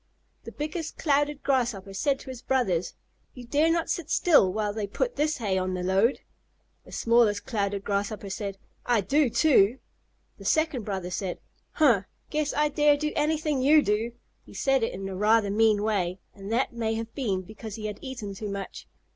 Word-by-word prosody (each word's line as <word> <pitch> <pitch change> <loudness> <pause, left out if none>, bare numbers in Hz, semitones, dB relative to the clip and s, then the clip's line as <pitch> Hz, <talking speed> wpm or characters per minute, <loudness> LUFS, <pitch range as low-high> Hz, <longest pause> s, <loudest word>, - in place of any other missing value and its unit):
The - - -7
biggest 310 +2 -5
Clouded 290 -1 +1
Grasshopper 235 -8 0
said 270 +8 +1
to 260 - -8
his 250 -2 -9
brothers, 210 -12 0 0.4
"You 250 -2 -9
dare 295 +6 +2
not 335 0 0
sit 330 -3 -3
still 290 - +4
while 210 +1 -1
they 210 -1 -3
put 485 - -2
this 305 +1 0
hay 200 -6 0
on 185 0 -2
the 180 - -3
load!" 195 +7 +2 0.6
The - - -15
smallest 230 -3 +2
Clouded 200 -3 -2
Grasshopper 200 0 -2
said, 195 0 -4 0.3
"I 240 -3 +2
do 280 +8 +2
too!" 235 -3 +4 0.6
The - - -11
second 310 -8 +1
brother 190 -3 -4
said, 185 0 -3 0.4
"Huh! 235 - +4 0.3
Guess 300 -1 0
I 300 +1 +2
dare 295 0 +4
do 300 +1 -2
anything 300 -2 0
you 295 +3 +6
do!" 220 +3 0 0.3
He - - -15
said 270 -2 +2
it 225 - 0
in 195 +1 -5
a 190 - -5
rather 210 +1 +3
mean 215 -1 +3
way, 190 -4 0 0.2
and 200 +1 -8
that 240 +2 +1
may 225 -1 -1
have 225 0 -5
been 200 -9 -1
because 215 +2 -9
he 215 - -7
had 210 -1 -5
eaten 245 -7 -6
too 205 +2 -6
much. 200 -1 -6
225 Hz, 190 wpm, -27 LUFS, 200-285 Hz, 0.6 s, you